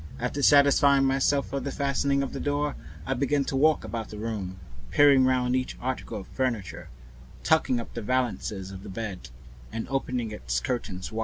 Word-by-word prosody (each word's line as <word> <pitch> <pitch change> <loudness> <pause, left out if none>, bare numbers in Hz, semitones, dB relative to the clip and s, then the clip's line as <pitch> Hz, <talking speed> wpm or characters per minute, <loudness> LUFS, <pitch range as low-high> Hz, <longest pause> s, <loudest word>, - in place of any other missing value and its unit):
After 125 +4 -2
satisfying 140 -1 +5
myself 135 +1 +1
of 140 -2 -2
the 140 - -3
fastening 140 0 0
of 135 - -5
the - - -4
door, 145 0 -1 0.3
I 135 - 0
began 140 +2 +1
to 135 - -3
walk 155 -1 +3
round 110 0 -5
the 105 - -8
room, 105 -4 -4 0.3
peering 140 -2 +6
round 125 -1 +2
each 130 0 -2
article 130 -4 -4
of 95 - -13
furniture, 120 -8 -3 0.5
tucking 155 -6 +3
up 115 - -8
the 115 - -4
valances 110 -5 -2
of 95 -1 -9
the - - -10
bed 95 - -6 0.4
and 115 - -4
opening 125 -4 -2
its - - -2
curtains 95 - -4
wide. 110 - -4
130 Hz, 180 wpm, -27 LUFS, 110-140 Hz, 0.5 s, peering